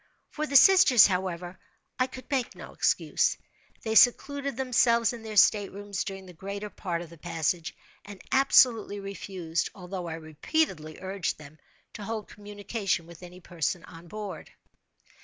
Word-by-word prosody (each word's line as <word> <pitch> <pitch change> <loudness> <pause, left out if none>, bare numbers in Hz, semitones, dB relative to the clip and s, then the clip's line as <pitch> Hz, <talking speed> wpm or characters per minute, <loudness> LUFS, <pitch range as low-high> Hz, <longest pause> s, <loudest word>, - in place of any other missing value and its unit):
For 305 0 -3
the 280 - -5
sisters, 315 - +8
however, 180 -2 -2 0.4
I 255 - +2
could 255 0 -11
make 260 -3 -1
no - - -11
excuse. - - +1 0.5
They 220 - -2
secluded 275 +3 +3
themselves 240 -3 +2
in 235 - -8
their 220 -1 -6
staterooms 200 -1 +2
during 195 -2 -7
the 180 - -12
greater 200 +4 -6
part 175 -3 -4
of 165 - -13
the 170 - -14
passage, 165 0 -2 0.3
and 205 -2 -11
absolutely 245 -6 +4
refused, 185 -4 -4
although 180 -2 -6
I 160 - -4
repeatedly 160 - -2
urged 190 -1 -3
them, 150 +1 -14 0.3
to 210 - -8
hold 220 0 -5
communication 205 -3 -3
with 170 0 -14
any 180 +1 -12
person 170 0 -3
on 165 +1 -13
board. 210 +1 -7
195 Hz, 150 wpm, -27 LUFS, 175-225 Hz, 0.5 s, sisters